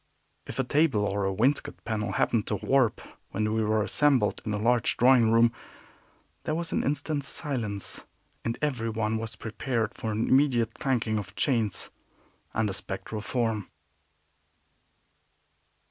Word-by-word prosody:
If - - -7
a 135 - +2
table 135 -5 +2
or 100 0 -1
a 95 - +1
wainscot 125 +9 0
panel 110 -1 -2
happened 115 -3 +1
to - - 0
warp 130 -4 +2 0.3
when 110 +1 -1
we 110 0 +1
were 110 0 +2
assembled 130 -3 +2
in - - -5
the 105 - 0
large 115 +2 +2
drawing 125 -2 +5
room, 115 +1 +5 0.9
there 155 - -1
was 165 0 -2
an - - 0
instant 145 +1 -1
silence, 120 - -3 0.4
and 115 0 -2
everyone 115 -5 0
was 110 0 -5
prepared 115 0 -2
for 110 - -4
an 110 +2 -1
immediate 125 -5 +3
clanking 115 -5 0
of 100 0 -8
chains 115 -8 0 0.6
and 110 -1 0
a 100 - -2
spectral 95 +3 -4
form. 115 -3 -1
115 Hz, 145 wpm, -28 LUFS, 105-130 Hz, 0.9 s, drawing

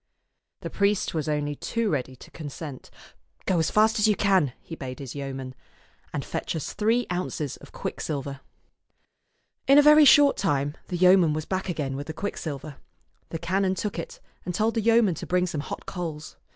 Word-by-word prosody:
The - - -6
priest 200 -1 +1
was 155 -1 -2
only 145 -1 -1
too 230 +6 -1
ready 130 -2 -2
to - - -15
consent. 145 -3 -8 0.3
" - - -36
Go 180 -3 +2
as 160 - +1
fast 220 +1 +3
as 210 - +4
ever - - +4
you 210 - +3
can," 190 - +2
he - - -11
bade 130 -4 -7
his 135 -4 -7
yeoman, 135 -2 -5 0.3
" - - -34
and - - -4
fetch - - -3
us 160 - -4
three 230 +3 +1
ounces 175 -5 -3
of - - -15
quicksilver." 140 -2 -4 1.3
In 275 +1 +7
a 290 - +8
very 300 0 +8
short 290 0 +7
time 145 -6 0
the 180 - -3
yeoman 180 -3 +5
was 155 0 -3
back 190 0 -3
again 145 -6 -2
with 145 +2 -6
the 160 - -4
quicksilver. 155 -6 -5 0.5
The 165 - -4
canon 185 +3 0
took 205 -2 -3
it, 165 - -7 0.2
and 180 0 -4
told 225 +2 +1
the 225 - 0
yeoman 225 -3 +4
to - - -7
bring 180 0 +2
some 165 -5 -3
hot - - -7
coals. 160 -4 -6
170 Hz, 195 wpm, -26 LUFS, 145-200 Hz, 1.3 s, a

